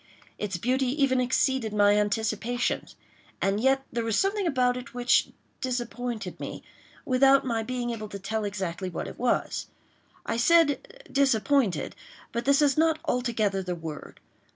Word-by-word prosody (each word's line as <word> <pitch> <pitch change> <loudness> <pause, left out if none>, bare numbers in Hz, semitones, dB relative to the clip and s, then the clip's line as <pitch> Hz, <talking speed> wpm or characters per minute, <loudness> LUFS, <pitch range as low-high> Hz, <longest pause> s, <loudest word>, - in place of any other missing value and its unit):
Its 200 -4 -2
beauty 255 +7 +1
even 260 -1 +2
exceeded 250 -2 +1
my 205 0 +5
anticipations—and 215 -1 -2
yet 270 +1 +3
there 235 0 -1
was 225 -2 0
something 390 -1 +1
about 250 -5 +2
it 250 0 -8
which 245 0 +3 0.3
disappointed 245 -2 -3
me - - -6 0.4
without 270 +1 +4
my 230 -3 0
being 245 +1 -3
able 215 -2 -5
to 200 - -6
tell 215 +3 -3
exactly 190 -3 -3
what 170 - -5
it - - -10
was. 245 0 0 0.6
I - - -1
said 330 - +2
"disappointed," 265 - +2 0.4
but 235 +1 -3
this 280 +2 +4
is 285 0 +3
not 320 -1 +3
altogether 230 -7 0
the 180 -1 -3
word. 160 -3 -8
245 Hz, 145 wpm, -27 LUFS, 210-265 Hz, 0.6 s, my